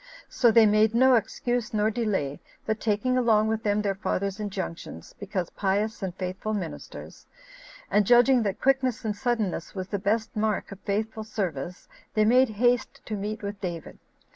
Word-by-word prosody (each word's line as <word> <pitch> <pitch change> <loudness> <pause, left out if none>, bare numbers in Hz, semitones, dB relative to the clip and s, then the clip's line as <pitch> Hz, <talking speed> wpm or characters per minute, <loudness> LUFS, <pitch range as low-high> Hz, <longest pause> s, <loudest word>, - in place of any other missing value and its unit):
So 240 - +3
they 225 0 +6
made 215 +1 +3
no 260 +2 +6
excuse 240 0 -1
nor 215 +1 +2
delay, 205 - -1 0.3
but 220 0 -1
taking 230 +4 +1
along 220 -3 +3
with 220 0 -1
them 210 -1 0
their 200 -1 +1
fathers' 195 0 -2
injunctions, 190 - -6
because 190 -4 -3
pious 205 +3 -1
and 185 -2 -4
faithful 190 +4 -3
ministers, 180 -6 -7 0.6
and 210 - +4
judging 245 +3 +5
that 200 -3 -2
quickness 260 -4 +1
and 210 -1 -1
suddenness 220 -7 -2
was 185 -1 -5
the 200 - -2
best 220 +3 -1
mark 215 -1 -1
of 195 - -9
faithful 215 +2 -2
service, 180 -7 -4 0.3
they 215 -1 +4
made 250 +3 +5
haste 240 +2 0
to 215 - -4
meet 210 +2 -4
with 200 0 -5
David. 175 -3 -6
215 Hz, 165 wpm, -26 LUFS, 195-225 Hz, 0.6 s, they